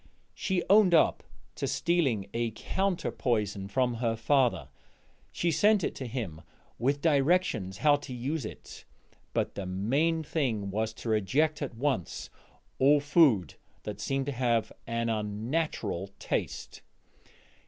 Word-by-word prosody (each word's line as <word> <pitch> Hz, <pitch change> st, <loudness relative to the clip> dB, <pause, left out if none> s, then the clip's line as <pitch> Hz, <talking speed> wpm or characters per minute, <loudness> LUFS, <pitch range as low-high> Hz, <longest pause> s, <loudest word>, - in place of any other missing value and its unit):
She 190 Hz, -2 st, -1 dB
owned 195 Hz, -3 st, +6 dB
up 160 Hz, -, +4 dB, 0.3 s
to -, -, -3 dB
stealing 135 Hz, -, +1 dB
a 115 Hz, 0 st, 0 dB
counter 190 Hz, -, -1 dB
poison 105 Hz, -5 st, -1 dB
from 125 Hz, +4 st, +1 dB
her 115 Hz, -1 st, 0 dB
father; 115 Hz, -, +1 dB, 0.6 s
she 170 Hz, -, 0 dB
sent 205 Hz, +3 st, +4 dB
it -, -, -1 dB
to 130 Hz, -, -6 dB
him 110 Hz, -10 st, -5 dB, 0.4 s
with 140 Hz, +4 st, +1 dB
directions 140 Hz, -, +2 dB
how 145 Hz, -1 st, +4 dB
to 145 Hz, -1 st, -10 dB
use 135 Hz, +5 st, -3 dB
it, 110 Hz, -, -9 dB, 0.5 s
but -, -, -1 dB
the 95 Hz, -2 st, -5 dB
main 140 Hz, -, +1 dB
thing 115 Hz, -11 st, -1 dB
was 110 Hz, +2 st, -1 dB
to 115 Hz, -, -6 dB
reject 130 Hz, +10 st, +1 dB
at 135 Hz, -5 st, -4 dB
once 130 Hz, -, -2 dB, 0.5 s
all 145 Hz, +2 st, +6 dB
food 140 Hz, -, +3 dB, 0.3 s
that -, -, -6 dB
seemed 135 Hz, 0 st, -1 dB
to 145 Hz, -, -2 dB
have 120 Hz, -3 st, 0 dB, 0.2 s
an 115 Hz, 0 st, -1 dB
unnatural 110 Hz, -, -2 dB
taste. -, -, -4 dB
125 Hz, 135 wpm, -29 LUFS, 110-155 Hz, 0.6 s, owned